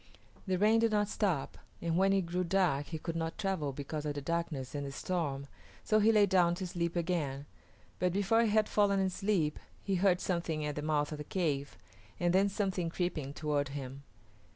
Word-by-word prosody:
The 185 -1 +1
rain 215 +4 +4
did 230 0 +3
not 210 -1 +1
stop, 180 -12 -1 0.2
and 170 -1 -1
when 195 +2 +4
it 195 0 +3
grew 180 +2 -1
dark 170 -6 +1
he 160 - -4
could 165 +1 -5
not 165 0 -3
travel 190 -8 -1
because 145 +2 -5
of 150 -1 -3
the 145 - -3
darkness 160 -4 -3
and 145 -1 -3
the 140 - -5
storm, 140 -3 -2 0.4
so 215 - +3
he 215 +2 +5
lay 210 -2 +5
down 180 -3 +3
to 185 - -4
sleep 170 -1 -2
again; 160 -6 -1 0.5
but 180 0 +2
before 200 +5 +3
he 230 - +2
had 215 0 +3
fallen 200 -1 +3
asleep 190 -4 0 0.2
he 195 - -1
heard 185 -1 +3
something 170 -5 -1
at 150 - -2
the 150 - -4
mouth 150 -1 0
of 150 - -5
the - - -4
cave, 145 - -2 0.4
and 175 0 +2
then 195 +2 +4
something 190 -4 -1
creeping 165 -5 -2
toward 145 -1 -1
him. 135 0 -7
175 Hz, 200 wpm, -32 LUFS, 150-195 Hz, 0.5 s, he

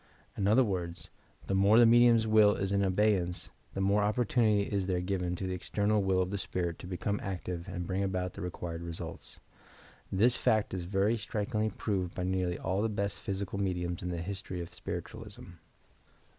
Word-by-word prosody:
In 100 - 0
other 115 +6 +5
words, 90 -6 -3 0.4
the - - -2
more 100 +3 +5
the 120 - +8
medium's 120 -1 +6
will 110 -1 +5
is 95 0 -2
in 100 0 +2
abeyance, 95 -2 +1 0.2
the 95 - -1
more 100 +2 +3
opportunity 105 -1 +2
is 100 -2 -2
there 90 -2 +1
given 90 -1 -1
to 95 - -4
the 95 - -2
external 105 +3 0
will 95 -1 +2
of 90 - -5
the 100 - -2
spirit 85 -3 -3
to - - -8
become 100 +3 -2
active 90 -2 -4
and 90 -2 -4
bring 95 +2 -1
about 95 -2 -1
the - - -8
required 85 -1 -5
results. 85 -1 -7 0.7
This 115 +6 +4
fact 110 -3 +1
is 90 -2 -3
very 100 +5 +1
strikingly 110 +1 -1
proved 95 -3 -2
by 90 - -2
nearly 90 -1 0
all 95 +2 -1
the 110 - +1
best 100 -1 -2
physical 100 0 -4
medionis 90 -3 -2
in 90 - -3
the 85 - -3
history 95 -1 -5
of 85 -1 -7
Spiritualism. - - -7
95 Hz, 185 wpm, -31 LUFS, 90-105 Hz, 0.7 s, the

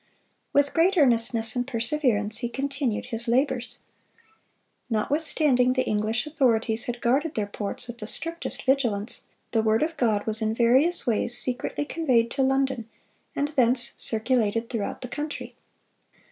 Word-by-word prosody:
With 285 0 +2
great 365 +4 +2
earnestness 230 -5 +3
and 245 0 -2
perseverance 230 -4 0
he 240 -1 -3
continued 275 -3 -3
his 230 +2 -2
labors. 245 -1 0 1.1
Notwithstanding 255 +1 +2
the 255 0 +1
English 215 +4 -1
authorities 240 -7 +1
had 240 0 -5
guarded 275 +6 0
their 215 - -1
ports 205 +3 -5
with 240 -1 -9
the 210 - -6
strictest 335 +7 0
vigilance, 240 -5 -1 0.3
the 225 - +2
word 220 +4 +2
of 325 +1 -3
God 220 -5 0
was 220 0 +3
in 220 0 -1
various 260 +9 +4
ways 240 +1 +1
secretly 270 +4 -2
conveyed 255 -8 +1
to 275 - -1
London, 265 -3 0 0.5
and 285 +1 -1
thence 250 -4 +2
circulated 225 -1 -1
throughout 220 -5 -4
the 250 - -6
country. 295 +4 -6
245 Hz, 145 wpm, -25 LUFS, 225-275 Hz, 1.1 s, various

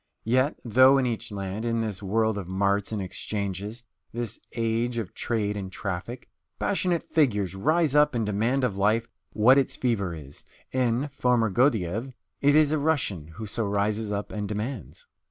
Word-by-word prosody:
Yet, 130 +5 +2
though 130 +4 +6
in 135 - +2
each 115 -4 -3
land, 100 +1 -4
in 115 -1 0
this 110 -4 -3
world 110 +2 +1
of 95 - -7
marts 100 +2 0
and 110 - -2
exchanges, 100 +3 -4 0.3
this 115 -2 -4 0.2
age 115 +1 0
of 110 -6 -4
trade 105 -3 -1
and 95 -2 -5
traffic, 100 +6 -5 0.3
passionate 180 -4 0
figures 105 - +2
rise 155 - +2
up 150 -2 +4
and 115 -2 0
demand 115 +6 0
of 120 -6 0
life 110 +4 +2 0.3
what 125 +6 +6
its 135 - -1
fever 100 -9 -1
is, 75 -3 -11 0.3
in 130 +2 0
"Foma 125 -5 +1
Gordyeeff" 115 0 +1 0.3
it 145 +1 +4
is 155 -1 +5
a 155 - +1
Russian 130 - 0
who 110 - -5
so 110 +2 -2
rises 105 +1 0
up 100 0 -3
and 105 -2 -4
demands. 105 +3 -5
110 Hz, 170 wpm, -26 LUFS, 100-130 Hz, 0.3 s, though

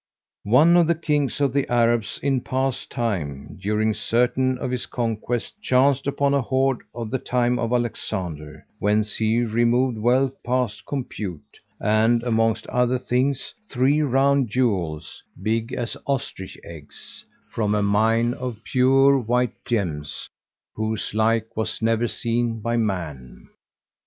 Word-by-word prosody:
One 155 +9 +6
of 170 -2 +4
the 170 - +3
Kings 150 -5 -1
of 140 -3 +1
the 140 -3 0
Arabs 120 -3 +2
in 135 -2 +1
past 130 0 -2
time, 85 - -3
during 105 +2 +1
certain 125 +4 +1
of 125 - -4
his 125 -1 -3
conquests, 115 0 -2
chanced 135 -2 +2
upon 140 0 +1
a 140 - +3
hoard 130 +1 +1 0.2
of 115 -2 -5
the 130 - 0
time 125 0 0
of 115 - -1
Alexander,[FN#152] 95 -10 -3 0.2
whence 105 +1 +1
he 110 +2 +2
removed 120 +1 +1
wealth 130 +4 +1
past 125 -4 -1
compute; 105 - -6 0.2
and, 110 +3 +2
amongst 115 -2 +1
other 125 +1 +1
things, 130 +2 -1 0.2
three 135 +4 +2
round 135 -2 +2
jewels, 95 -11 -1 0.2
big 110 +4 -1
as 120 -2 -3
ostrich 135 -9 -3
eggs, 80 -3 -10 0.3
from 105 -2 0
a 105 - +1
mine 115 +4 +2
of 125 -4 -6
pure 135 +2 +4
white 125 0 0
gems 85 - -3 0.5
whose 110 -1 -3
like 110 +1 +1
was 110 - -2
never 115 +1 +1
seen 115 0 -1
by 115 +2 -1
man. 85 - -3
120 Hz, 135 wpm, -23 LUFS, 110-130 Hz, 0.5 s, One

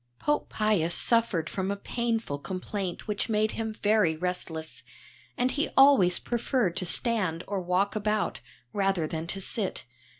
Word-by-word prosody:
Pope 295 - 0
Pius 205 -6 +1
suffered 225 -9 +2
from 190 0 -2
a 200 - 0
painful 225 -7 -2
complaint 185 +3 -4
which 210 +2 -1
made 215 0 +2
him 225 -1 -3
very 205 -7 +3
restless, 160 -6 -4 0.6
and 250 +1 +2
he 295 - 0
always 270 -11 +6
preferred 240 -6 0
to 185 -2 -1
stand 185 -6 +1
or 200 -1 -2
walk 180 +4 +1
about, 210 0 0 0.3
rather 195 -4 +1
than 160 +1 -4
to 195 - -4
sit. 195 - -4
200 Hz, 145 wpm, -28 LUFS, 175-220 Hz, 0.6 s, always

